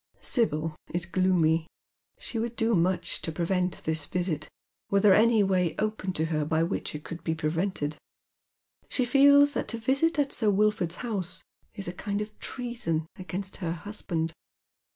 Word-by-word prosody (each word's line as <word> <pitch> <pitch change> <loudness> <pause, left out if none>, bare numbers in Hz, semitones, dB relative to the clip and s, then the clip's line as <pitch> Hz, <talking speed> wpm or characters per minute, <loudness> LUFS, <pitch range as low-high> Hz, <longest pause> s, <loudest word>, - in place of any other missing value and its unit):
Sibyl 160 - +1 0.2
is 175 -1 0
gloomy. 170 -3 +2 0.5
She 230 - -4
would 235 +1 -3
do 225 0 +1
much 180 0 +1
to 165 - -2
prevent 180 +2 -1
this 160 -2 0
visit, 170 -3 -2 0.4
were 200 - +3
there 195 -1 +6
any 220 +1 +5
way 185 -3 +1
open 215 -3 -1
to 160 - 0
her 155 -2 0
by 160 +2 +1
which 165 - -2
it 150 - -6
could 165 0 -8
be 160 - -1
prevented. 155 -1 -1 0.9
She 255 - +1
feels 285 +3 +6
that - - -2
to 230 - -2
visit 275 +8 +1
at 285 -1 +1
Sir 220 -3 +2
Wilford's 205 -4 +1
house 185 -6 -3 0.3
is 200 - -4
a 175 - -4
kind 200 +2 -3
of 210 0 -5
treason 235 -11 -2
against 185 +2 -1
her 170 -3 -2
husband. 170 -3 -3
185 Hz, 165 wpm, -28 LUFS, 165-220 Hz, 0.9 s, there